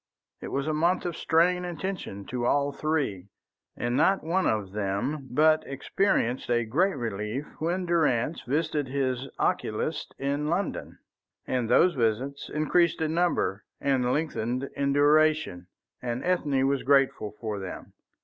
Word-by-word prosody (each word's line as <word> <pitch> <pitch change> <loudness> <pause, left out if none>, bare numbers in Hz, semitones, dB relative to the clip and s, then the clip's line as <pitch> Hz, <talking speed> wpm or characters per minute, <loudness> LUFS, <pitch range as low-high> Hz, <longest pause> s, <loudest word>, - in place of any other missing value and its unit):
It - - -5
was 140 0 -2
a 155 - 0
month 170 +5 +1
of 175 -2 -2
strain 180 +2 +2
and 175 -2 -5
tension 175 - -5
to 120 +1 -2
all 140 +1 +2
three, 140 - -2 0.5
and 120 0 -1
not 195 +8 +3
one 180 +4 +1
of 105 -4 -1
them 105 +8 -2
but 155 +4 +4
experienced 135 - 0
a 120 -1 +2
great 175 - +1
relief 110 +3 -3
when 175 +4 -1
Durrance 160 -4 +1
visited 150 +1 -1
his 130 -1 -2
oculist - - -1
in 140 +2 -1
London. 175 +5 -2 0.5
And 125 -3 -1
those 180 - +5
visits 130 +2 -1
increased 160 +3 +2
in 160 0 0
number, 170 - 0 0.2
and 130 -3 +1
lengthened 135 -3 -2
in 140 0 0
duration. 145 - +3 0.4
Even 120 0 -3
Ethne 145 -7 +1
was 140 -1 +1
grateful 135 -6 +2
for 105 -3 -3
them. 95 -1 -8
140 Hz, 145 wpm, -27 LUFS, 120-160 Hz, 0.5 s, those